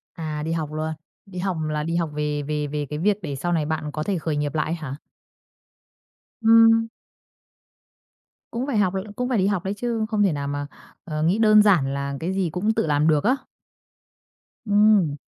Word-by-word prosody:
À, 155 -2 -4
đi 160 - -2
học 160 -2 -2
luôn. 155 +1 -2 0.3
Đi 190 -3 -8
học 185 -2 -1
là 150 0 -1
đi 165 +1 -2
học 170 -2 0
về 150 0 -2
về 150 0 -2
về 145 0 -3
cái 150 - -4
việc 205 +3 +2
để 145 -5 -4
sau 175 +6 -2
này 160 -3 +1
bạn 155 -1 -3
có 155 +1 -3
thể 195 +1 -1
khởi 155 -1 -2
nghiệp 145 -1 -2
lại 160 +2 -1
á 150 - -5
hả? 135 - -4 1.5
Ừm. 225 0 +6 1.6
Cũng 250 +4 -3
phải 255 - 0
học 195 -3 +2
rồi 190 - -2
cũng 250 +3 -2
phải 245 - +1
đi 190 0 +2
học 195 -4 0
đấy 195 +1 -2
chứ, 225 0 -2
không 210 -2 +2
thể 190 - +3
nào 140 -1 -3
mà, 145 0 -3 0.4
ờ, 155 -2 -3
nghĩ 180 +6 +2
đơn 215 -1 +6
giản 170 -10 +3
là 140 0 -3
cái 175 +4 -2
gì 190 -3 0
cũng 195 +7 0
tự 160 - 0
làm 150 +1 +2
được 150 -2 +3
á. 255 +4 +3 1.3
Ừm. 205 -7 +4
165 Hz, 210 wpm, -23 LUFS, 150-205 Hz, 1.6 s, Ừm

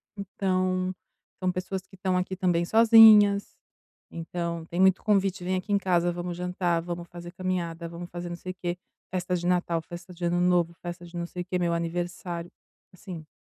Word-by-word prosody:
Então, 185 -2 -1 0.5
são 185 -1 +1
pessoas 185 +1 -4
que - - -16
estão 185 -1 0
aqui 185 +1 -2
também 175 -2 +1
sozinhas, 220 -2 +7 0.6
então 170 0 -4
tem 170 +2 -5
muito 190 0 +4
convite: 195 -3 +1
“Vem 185 +1 0
aqui 185 +3 -4
em - - +5
casa, 175 -3 +1
vamos 175 0 -5
jantar, 180 -1 0
vamos 175 0 -6
fazer 175 0 -9
caminhada, 175 -2 -3
vamos 170 +1 -8
fazer 175 0 -6
não 175 - -4
sei 185 - -6
o - - -38
quê, 175 -1 -3 0.3
festa 180 0 -1
de 175 0 -3
Natal, 175 -2 +1
festa 175 +2 -10
de 175 0 -5
Ano 175 +1 +1
Novo, 175 -1 +2
festa 175 0 -7
de 175 +1 -13
não 170 - -2
sei 180 - -6
o - - -23
quê, 180 0 -2
meu 170 -1 +1
aniversário”, 175 0 -3 0.4
assim 175 -4 -9
180 Hz, 190 wpm, -27 LUFS, 175-185 Hz, 0.6 s, sozinhas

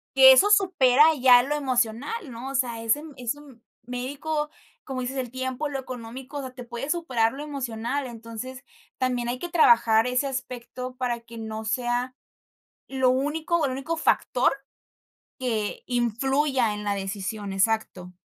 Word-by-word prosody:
que 265 0 +10
eso 395 +10 +5
supera 335 -10 +5 0.2
ya 245 -1 +8
lo 295 +3 -1
emocional, 260 - -1
¿no? 245 +3 -7
O 275 - -7
sea, 240 -3 0
ese 230 +6 +2
m 275 -3 -7 0.2
médico 285 +5 -3 0.4
como 265 -2 -4
dices, 255 +2 -4
el 255 -2 -3
tiempo, 260 +3 -3
lo 275 - -3
económico, 255 +2 -8
o - - -2
sea, 260 -1 -7
te 250 - -8
puede 240 +4 -6
superar 255 -10 +1
lo 280 +2 -7
emocional, 265 -2 -3
entonces 235 +3 -8 0.4
también 245 -2 0
hay 250 - -3
que 350 - -5
trabajar 235 -8 +5
ese 250 +3 +1
aspecto 255 -1 -5
para 245 -2 -2
que 230 0 -12
no 220 0 -5
sea 245 +2 -1 0.7
lo 260 -1 +2
único 310 +5 0
el 260 - -2
único 275 +6 -3
factor 255 -5 +2 0.9
que 225 -5 -2
influya 250 0 +1
en 210 0 -6
la 200 -1 0
decisión. 195 +1 -4
Exacto. 195 -3 -1
255 Hz, 155 wpm, -25 LUFS, 230-275 Hz, 0.9 s, que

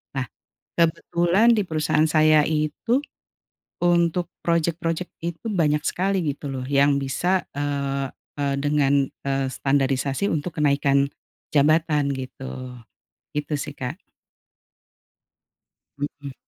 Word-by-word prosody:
Nah 135 -1 -1 0.5
kebetulan 175 +6 +3
di 215 - +2
perusahaan 155 -2 +1
saya 155 -1 +5
itu 155 - 0 0.9
untuk 175 0 +2
projek-projek 170 +1 -1
itu 170 +5 -5
banyak 150 -5 +1
sekali 190 0 0
gitu 145 +1 -8
loh 130 -2 -4
yang 140 +1 +3
bisa, 175 +7 0
eee 140 -1 -2 0.3
eee 140 -1 0
dengan, 140 -1 +2
eee, 135 0 -3
standarisasi 135 +5 0
untuk 165 +2 -3
kenaikan 140 -2 +2 0.4
jabatan 150 0 +3
gitu. 130 -1 -6 0.6
Gitu 150 +1 -2
sih 145 +1 -4
Kak. 130 +5 -4 2.0
Mhm. 145 -1 -5
150 Hz, 100 wpm, -24 LUFS, 140-165 Hz, 2.0 s, saya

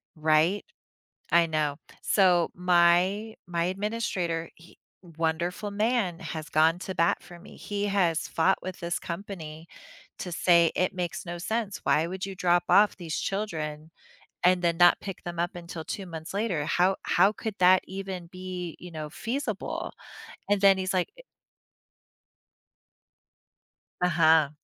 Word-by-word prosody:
right? 160 +5 +2 0.7
I 170 0 +5
know. 150 -3 -1 0.3
So 180 -4 +3
my 180 +5 +3
my 170 -1 -1
administrator, 185 -4 -2
he 170 +1 -18 0.2
wonderful 170 +4 -2
man, 210 -4 0
has 160 -3 -6
gone 160 +3 +3
to 190 0 -5
bat 170 0 +1
for 175 - -13
me. 190 - -14
He 205 0 -3
has 180 -5 +1
fought 175 +4 +2
with 185 0 -6
this 170 0 -2
company 170 -3 -7 0.5
to 180 - -5
say 170 -1 +4
"It 185 +1 0
makes 180 +1 -3
no 175 0 -5
sense. 220 +2 -3
Why 155 +2 +3
would 190 +2 -4
you 195 - -6
drop 175 -1 +2
off 210 0 +5
these 165 -4 -4
children 160 -6 -4 0.5
and 180 0 +4
then 170 -1 +2
not 175 0 +6
pick 195 -3 -7
them 175 -1 -6
up 175 +1 -1
until 170 -2 -7
2 195 +3 -5
months 165 0 -8
later? 200 -8 -1
How 185 +2 +2
how 195 +4 +3
could 220 -1 -5
that 185 +1 +6
even 190 -2 -6
be, 185 -2 -6
you 180 - -9
know, 155 -2 -6
feasible?" 230 - -4 0.6
And 205 -1 +2
then 195 -1 +6
he's 185 0 -1
like 180 - +1
eh - - -12 2.8
Uh-huh. 160 -3 +4
180 Hz, 145 wpm, -27 LUFS, 165-195 Hz, 2.8 s, not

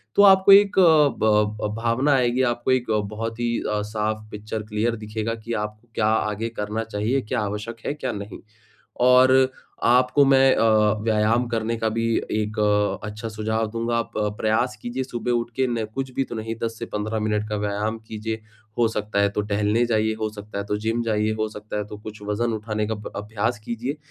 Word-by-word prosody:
तो 205 - +6
आपको 190 0 +7
एक 200 0 +7
अ, 160 -5 +6
ब 105 -1 +2
अ, - - +1
भावना 125 +5 +2
आएगी 125 0 +2
आपको 120 +2 -2
एक 125 -3 +1 0.2
बहुत 115 +1 -4
ही 120 -1 0
अ, 105 0 0
साफ 110 0 -2
पिक्चर 105 +1 -5
क्लियर 110 +2 -1
दिखेगा 110 +1 -3
कि 115 +1 -6
आप 105 0 -6 0.2
क्या 110 - +1
आगे 110 0 0
करना 105 +2 -2
चाहिए, 110 +5 -1
क्या 125 +1 -2
आवश्यक 105 +3 -4
है, - - -1
क्या 150 -4 -3
नहीं? 100 0 -7 0.6
और 130 +1 +5 0.3
आपको 125 +4 +4
मैं 135 -1 +5
अ, 110 -2 +4
व्यायाम 110 +2 +2
करने 115 0 -1
का 110 0 0
भी 115 +1 -1 0.3
एक 105 0 -2
अ, 105 0 +1
अच्छा 105 +2 -6
सुझाव 110 +1 -1
दूँगा। 115 +1 -1
आप 115 - -3
अ, 105 -1 +1
प्रयास 110 +2 +1
कीजिए 125 +2 -3
सुबह 125 -1 -3
उठ 120 -1 0
के 130 0 +1
न 115 -2 -1
कुछ 135 -1 -3
भी 135 - +1
तो - - -8
नहीं, 110 +1 -4
10 115 0 -3
से - - -4
15 110 +1 -3
मिनट 105 0 -1
का 105 - -1
व्यायाम 105 +2 -2
कीजिए। 110 +1 -4 0.4
हो 115 - +5
सकता 105 -2 -2
है 100 0 +3
तो 100 - -2
टहलने 105 +3 +1
जाइए, 110 -2 +1
हो 110 0 -3
सकता 105 -1 -9
है 100 - -2
तो 105 - -1
जिम 115 +2 -1
जाइए, 110 -1 0
हो 110 0 -1
सकता 105 0 -7
है 105 - -2
तो 105 - -8
कुछ 105 0 -10
वजन 110 +3 -1
उठाने 110 0 -2
का 110 - -1
अभ 105 -1 -8
अभ्यास 110 +3 -2
कीजिए। 120 +6 -4
110 Hz, 205 wpm, -23 LUFS, 105-120 Hz, 0.6 s, आपको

